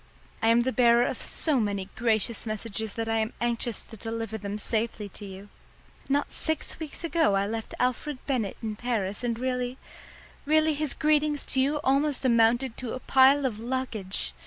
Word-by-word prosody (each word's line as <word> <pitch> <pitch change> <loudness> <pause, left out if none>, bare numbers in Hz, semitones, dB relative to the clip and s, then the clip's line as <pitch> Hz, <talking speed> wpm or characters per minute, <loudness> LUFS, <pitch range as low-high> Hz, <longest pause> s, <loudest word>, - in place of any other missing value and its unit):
"I 225 - +2
am 230 +1 +5
the 260 +2 0
bearer 240 -1 +5
of - - -3
so 300 -5 +2
many 200 -3 -1
gracious 225 0 0
messages 215 0 -3
that 225 0 -3
I 225 0 +1
am 220 0 -1
anxious 235 -1 -2
to 225 - -12
deliver 225 +1 -5
them 205 -1 -4
safely 215 0 -1
to 205 - -9
you. 195 +1 -9 0.6
Not 285 +1 +1
six 315 -1 -1
weeks 315 0 -7
ago 330 -11 +2
I 195 0 +2
left 225 +1 -5
Alfred 255 +3 0
Bennett 245 -8 -1
in 215 -1 -3
Paris, 215 -2 -2
and 235 -2 -1
really 250 0 -2 0.7
really 310 +1 +3
his 300 -1 -1
greetings 300 -1 +2
to 260 - +3
you 290 +3 +1
almost 275 0 +1
amounted 235 +1 +3
to 250 -3 -4
a - - -4
pile 270 +2 +5
of 220 -5 -2
luggage. 235 -5 -1
235 Hz, 180 wpm, -27 LUFS, 220-265 Hz, 0.7 s, am